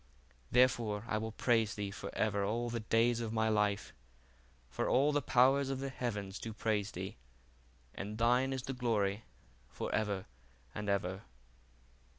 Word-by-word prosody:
Therefore 115 -4 +3
I 110 -2 0
will 110 +1 -4
praise 115 -1 +2
thee 100 -2 -3
for 100 0 -6
ever 100 -2 +1
all 115 +4 -1
the 115 - -2
days 115 +2 +2
of 115 -2 -3
my 110 0 +1
life: 105 -1 +1 0.7
for 60 - -2
all 140 +3 +4
the 145 0 +1
powers 135 +2 +4
of 135 -1 -2
the 135 0 -3
heavens 105 -7 -3
do 110 - -5
praise 105 -2 0
thee, 95 +3 -6 0.8
and 105 +2 -5
thine 125 +3 +3
is 130 -2 -3
the 135 - -3
glory 110 -4 0 0.4
for - - -4
ever 100 -3 0 0.5
and 105 0 -4
ever. 95 -1 0
110 Hz, 160 wpm, -34 LUFS, 105-120 Hz, 0.8 s, all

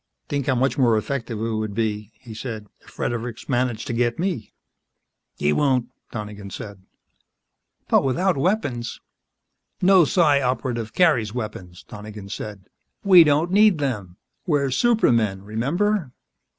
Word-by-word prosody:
"Think 140 -2 -2
how 130 - +2
much 130 +3 0
more 120 -4 +4
effective 115 0 -3
it 115 +1 -2
would 110 -2 -3
be," 105 -2 -2
he 110 +1 -12
said, 110 -2 -6
"if - - -19
Fredericks 120 -1 -4
managed 120 -4 -1
to 130 - -3
get 120 0 0
me." 170 - -3 0.9
"He 75 +1 +1
won't," 130 - +1 0.2
Donegan 105 -3 -7
said. 100 0 -8 1.1
"But - - +4
without 170 +8 +1
weapons 135 - -1 0.4
" - - -56 0.3
"No 185 -1 +7
Psi 150 -3 +3
Operative 125 -3 -2
carries 115 - +2
weapons," 95 -7 -6
Donegan 105 -1 -9
said. 100 -1 -7 0.4
"We 185 -4 +8
don't 155 +3 +2
need 205 -2 +5
them. 105 -11 -3 0.3
We're 140 -5 +1
supermen... 115 - +2
remember?" 150 - -1
120 Hz, 135 wpm, -23 LUFS, 110-145 Hz, 1.1 s, We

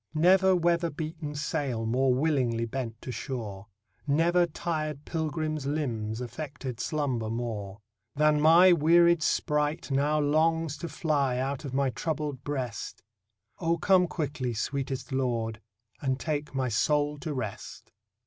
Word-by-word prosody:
Never 185 +4 +5
weather 170 -1 +2
beaten 155 0 -5
sail 135 -5 -2
more 130 +3 +2
willing 125 -4 +1
bent 115 -2 -5
to 125 - -5
shore, 110 -5 -5 0.4
Never 170 +4 +3
tired 155 -3 -3
pilgrim's 155 -2 -2
limbs 120 -7 -2
affected 130 -1 -6
slumber 130 -7 -1
more, 105 -4 -4 0.3
Than 150 0 +3
my 170 +4 +7
wearied 170 +1 +5
sprite 150 -2 0
now 145 +3 +2
longs 160 +1 +2
to 170 - -6
fly 140 -4 0
out 135 +3 -2
of 130 -2 -5
my 135 -1 +2
troubled 150 -3 -3
breast. 130 -9 -4 0.6
O 165 0 +1
come 180 +2 +4
quickly, 140 -8 -3
sweetest 135 +3 -3
Lord, 115 -4 -1 0.4
and 130 -1 0
take 150 -3 -3
my 130 -1 0
soul 145 +6 +1
to 155 - -4
rest. 125 -8 -6
145 Hz, 130 wpm, -28 LUFS, 125-155 Hz, 0.6 s, my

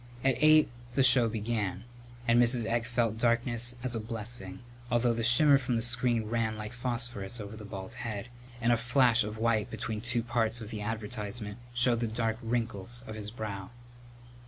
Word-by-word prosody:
At 135 0 +4
eight 155 0 +6 0.3
the 135 - +4
show 125 -3 +6
began, 105 -3 -2 0.4
and 120 +1 +5
Mrs. 120 -1 +3
Egg 115 +1 -1
felt 115 -2 0
darkness 120 0 +2
as 130 -2 -2
a 115 - -1
blessing, 110 -3 -5 0.3
although 120 0 +2
the 115 - -2
shimmer 135 +4 +5
from 125 -2 -1
the 115 - +1
screen 120 -1 +2
ran 110 -1 -1
like 105 +2 -6
phosphorus 120 -3 -3
over 105 0 -7
the 105 -1 -9
bald 95 +1 -7
head, 115 -2 -5 0.3
and 120 0 +3
a - - +2
flash 120 -1 +3
of 105 +1 -6
white 110 -2 +1
between 110 -1 -4
two 120 0 0
parts 115 0 +1
of 110 -2 -7
the 105 - -5
advertisement 105 0 -5 0.2
showed 120 -1 +3
the 115 - -1
dark 115 0 -2
wrinkles 115 0 -2
of 110 - -7
his 105 -1 -6
brow. 105 -4 -6
115 Hz, 180 wpm, -30 LUFS, 110-120 Hz, 0.4 s, eight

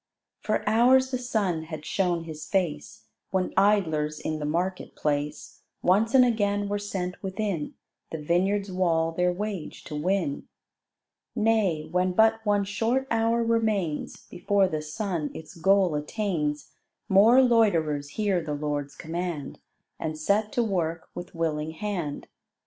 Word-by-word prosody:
For 215 - -2
hours 255 +4 +4
the 255 - -1
sun 200 -10 -1
had 155 -2 -7
shown 175 -1 0
his 155 -1 -8
face, 160 -4 -2 0.2
When 190 -1 -1
idlers 160 -7 +2
in 155 0 -3
the 150 - -3
market 180 +4 -2
place 150 0 -3 0.2
Once 215 +7 +3
and 255 -1 +8
again 205 -3 +1
were 205 0 -1
sent 190 -3 -4
within 190 -5 -3 0.3
The 160 - -4
vineyard's 190 +6 0
wall 165 -3 +1
their 180 +2 +1
wage 200 -2 -5
to 150 - -7
win. 170 -1 -1 0.9
Nay, 210 -9 +1
when 180 0 +1
but 220 +2 +4
one 205 -2 +2
short 225 +6 0
hour 230 +1 +2
remains 215 -9 -1
Before 200 +1 +1
the 155 -4 -3
sun 155 0 -3
its 160 +1 -9
goal 190 0 +3
attains, 150 -2 -2 0.4
More 225 +7 +6
loiterers 165 - +2
hear 200 -5 +1
the 150 -2 -3
Lord's 145 -1 -3
command 165 -3 -5 0.4
And 155 -1 -3
set 205 +7 +1
to 240 - +2
work 170 -6 -2
with 175 - -8
willing 160 -1 -1
hand. 175 -6 -4
185 Hz, 140 wpm, -26 LUFS, 155-210 Hz, 0.9 s, and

